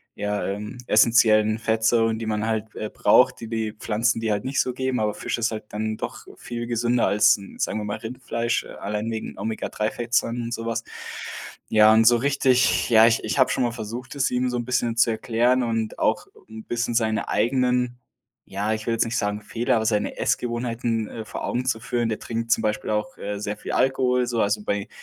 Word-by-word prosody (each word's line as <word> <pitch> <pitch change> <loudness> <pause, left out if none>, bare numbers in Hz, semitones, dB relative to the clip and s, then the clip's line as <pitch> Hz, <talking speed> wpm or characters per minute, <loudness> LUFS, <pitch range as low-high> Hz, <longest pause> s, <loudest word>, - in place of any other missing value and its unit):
ja, 105 0 -2
ähm, 105 +5 -5
essenziellen 110 -1 +4
Fettsäuren, 110 0 +2
die 115 - -4
man 105 0 -1
halt, 110 -1 -2
äh, 110 - -4
braucht, - - +3
die 115 - -7
die 110 -2 -2
Pflanzen, 115 +2 0
dir 110 -1 0
halt 105 0 -1
nicht 135 +1 +1
so 125 - -2
geben, 130 -1 -1
aber 105 -1 0
Fisch - - -3
ist 115 0 +1
halt 110 -1 -5
dann 110 +1 -3
doch - - -6
viel 120 0 -6
gesünder 120 +1 +1
als, 105 0 +5
hm, 100 -1 -12
sagen 110 - -1
wir - - -4
mal, 105 0 -3
Rindfleisch, 120 0 -2
äh, - - -12
allein 105 +3 -3
wegen 110 -1 -5
Omega-3-Fettsäuren 115 +3 -1
und 120 0 -4
so 115 0 -4
was. 115 0 -2 0.9
Ja, 110 0 +6
und 110 0 +5
so 120 +1 +6
richtig 130 -1 +2
ja, 110 0 +8
ich 115 -1 +2
ich - - -2
habe 130 - +5
schon - - 0
mal 120 - 0
versucht, 120 +2 -7
es 140 -1 +1
ihm 125 0 +1
so 125 - -2
'n 120 - -3
bisschen 120 -2 0
zu 115 +1 +4
erklären 120 +3 +1
und 115 -2 -2
auch - - +1 0.2
'n 110 0 -10
bisschen 120 0 -2
seine 110 -1 0
eigenen 125 +2 +1 0.5
ja, 100 +3 -2
ich 110 -1 -4
will 115 - 0
jetzt 115 - +2
nicht 115 +1 -2
sagen, 105 0 -1
Fehler, 115 +3 0
aber 110 - -1
seine 105 -2 0
Essgewohnheiten, 120 -2 -1
äh, 115 - -6
vor - - -5
Augen 125 - -1
zu 125 -3 0
führen. 120 0 -1
Der 110 - -2
trinkt 115 0 -4
zum - - +4
Beispiel 105 -1 -2
auch, 105 0 -2
äh, 100 0 -4
sehr 105 0 -3
viel - - -6
Alkohol, 125 -1 +2
so. 115 -2 0
Also, 105 +1 0
bei 100 -1 -1
115 Hz, 215 wpm, -24 LUFS, 110-120 Hz, 0.9 s, ja